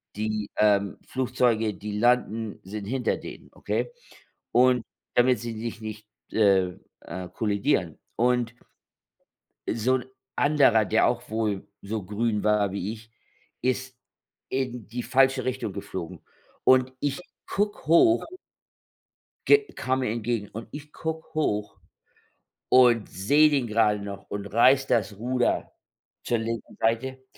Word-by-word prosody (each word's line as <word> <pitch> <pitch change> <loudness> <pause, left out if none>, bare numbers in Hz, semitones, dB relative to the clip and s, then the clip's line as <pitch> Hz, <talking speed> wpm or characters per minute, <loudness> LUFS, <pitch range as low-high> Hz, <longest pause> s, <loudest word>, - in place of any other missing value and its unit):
die, 105 0 -2
ähm, 100 -2 +3
Flugzeuge, 125 -4 +1
die 105 +2 -5
landen, 115 -2 +1
sind 100 +1 -6
hinter 125 +3 -1
denen, - - -10
okay? - - -2 0.6
Und 125 -1 +4 0.3
damit 125 -1 +4
sie 115 0 -5
dich 115 0 -5
nicht, 110 -1 -7 0.3
äh 95 -4 +3 0.3
äh 90 +1 -7
kollidieren. 105 -3 0 0.2
Und 125 -1 +1 1.2
so 125 +3 +2
'n 125 - -5 0.3
anderer, 140 -7 +4
der - - +3
auch - - -1
wohl 110 -3 -1 0.2
so 105 +1 -4
grün 105 +2 -1
war 105 -2 +3
wie 100 +1 -3
ich, 110 0 -12 0.5
ist 130 0 -1 0.5
in 125 -4 -3
die 120 +3 -5
falsche 135 0 +3
Richtung 130 -5 -2
geflogen. 90 -3 -6 0.4
Und 130 0 +5
ich 145 +3 -1 0.3
gucke 205 -3 -2
hoch 170 - +5 1.2
ge 425 - +8 0.2
kam 130 +1 0
mir 125 -5 -1
entgegen, 115 -2 -2
und 115 +3 -8
ich 150 0 -9
guck 160 0 -5
hoch 105 -9 -1 0.9
und 120 -3 +5
sehe 145 +11 +4
den 140 -4 +1
grade 105 -2 +2
noch 100 -1 -8
und 100 0 -4
reiße 130 +5 +4
das 110 -5 0
Ruder 125 +3 0 0.5
zur 120 - +1
linken 115 0 -5
Seite. 130 +4 0
115 Hz, 130 wpm, -26 LUFS, 105-130 Hz, 1.2 s, ge